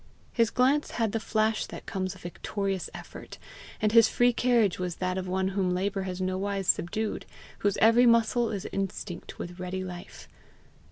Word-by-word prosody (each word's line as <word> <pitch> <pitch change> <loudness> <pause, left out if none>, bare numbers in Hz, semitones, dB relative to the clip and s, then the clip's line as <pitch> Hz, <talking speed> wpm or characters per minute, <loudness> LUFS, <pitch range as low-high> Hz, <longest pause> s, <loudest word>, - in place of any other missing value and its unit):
His 230 -2 +3
glance 270 +4 +2
had 225 -3 +1
the 225 - -1
flash 220 0 0
that - - -9
comes 185 -1 -3
of 185 - -15
victorious 195 +2 -3
effort, - - -10 0.4
and 215 - +2
his 230 0 +7
free 245 0 +3
carriage 235 -6 +2
was 180 -2 -2
that 185 0 -2
of 185 0 -3
one 190 +1 0
whom 190 -2 0
labour 195 +1 -1
has 180 0 -5
nowise 190 +1 -1
subdued, 210 +5 0 0.3
whose 205 -1 +1
every 230 +3 +6
muscle 230 0 +3
is 200 -3 -4
instinct 195 -2 -4
with 175 +1 -7
ready 185 +1 -3
life. 180 -1 -9
195 Hz, 170 wpm, -28 LUFS, 185-225 Hz, 0.4 s, his